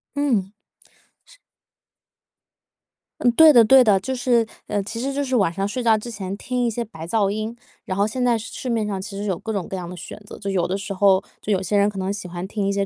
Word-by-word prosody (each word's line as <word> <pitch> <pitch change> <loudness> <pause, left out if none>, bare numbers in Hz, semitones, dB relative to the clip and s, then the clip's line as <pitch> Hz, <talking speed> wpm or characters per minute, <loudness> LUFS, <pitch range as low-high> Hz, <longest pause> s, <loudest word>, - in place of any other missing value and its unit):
嗯。 230 -10 0 0.7
是 - - -20 1.8
嗯， 245 - +4
对 320 +4 +8
的 240 -5 +7
对 265 +3 +7
的。 205 -4 +4
就 260 +7 -3
是 240 -2 +2 0.2
呃， 205 -1 -1
其 220 +3 -7
实 270 +3 -2
就 285 +1 -1
是 260 -1 -1
晚 195 -8 +3
上 195 +3 -2
睡 250 +4 -3
觉 225 -2 +4
之 215 +3 -7
前 195 -4 -5
听 250 +2 -2
一 - - +2
些 235 +1 -3
白 165 -7 -9
噪 200 +2 +1
音， 215 +2 -3 0.3
然 185 - -4
后 200 +1 +2
现 250 +4 -3
在 240 -2 +3
市 235 +3 -6
面 225 -3 0
上 195 -2 -3
其 190 - -7
实 205 - -4
有 190 -4 -1
各 220 - -5
种 200 -5 -3
各 - - -5
样 180 -2 -6
的 180 - -7
选 - - -9
择。 - - -11
就 200 - -4
有 185 -3 +1
的 190 +2 -1
时 200 0 -5
候 195 0 +4 0.2
就 215 - -3
有 190 -2 +2
些 190 +2 0
人 200 +1 +4
可 205 - -8
能 190 +1 -1
喜 190 -3 -7
欢 175 +1 -5
听 205 0 -2
一 200 - +1
些 200 0 0
210 Hz, 275 characters per minute, -22 LUFS, 195-235 Hz, 1.8 s, 对